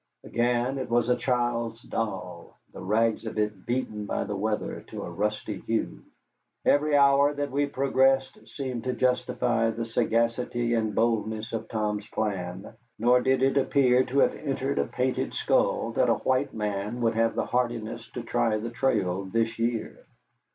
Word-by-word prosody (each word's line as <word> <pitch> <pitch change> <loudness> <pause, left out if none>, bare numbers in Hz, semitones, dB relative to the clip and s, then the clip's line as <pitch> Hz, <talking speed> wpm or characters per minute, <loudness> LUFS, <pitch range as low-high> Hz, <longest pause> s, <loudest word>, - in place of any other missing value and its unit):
Again 120 +3 0
it 130 - -4
was 120 0 +2
a 125 - +4
child's 120 -2 -1
doll, 90 -6 -5 0.2
the - - -9
rags 110 +3 +1
of 110 - -6
it 105 -3 -2
beaten 110 -4 -2
by - - -1
the 105 - -4
weather 105 +2 -2
to - - -6
a - - -6
rusty 105 -1 -2
hue. 115 +3 -2 0.6
Every 150 +1 +3
hour 140 +1 +5
that 145 0 -2
we 145 +1 +1
progressed 135 -1 +2 0.2
seemed 130 -4 -4
to 130 - 0
justify 125 -2 +1
the 115 +1 -3
sagacity 115 +1 0
and 110 -2 0
boldness 110 0 0
of 115 - -3
Tom's 105 -1 -2
plan, 95 -3 -3 0.2
nor 125 +2 +4
did 130 0 +2
it 135 +1 +3
appear 130 -2 +4
to 135 - -3
have - - +4
entered 135 -1 -2
a - - +2
painted 130 0 -1
skull - - +1
that - - +2
a - - +4
white 130 +2 0
man 105 +2 -3
would 115 -1 +2
have 115 0 +1
the - - 0
hardihood 120 -2 -1
to 120 - -4
try 115 -1 +1
the 115 +2 -5
trail 100 -7 0
this 115 +3 -1
year. 115 0 -2
115 Hz, 165 wpm, -27 LUFS, 110-130 Hz, 0.6 s, hour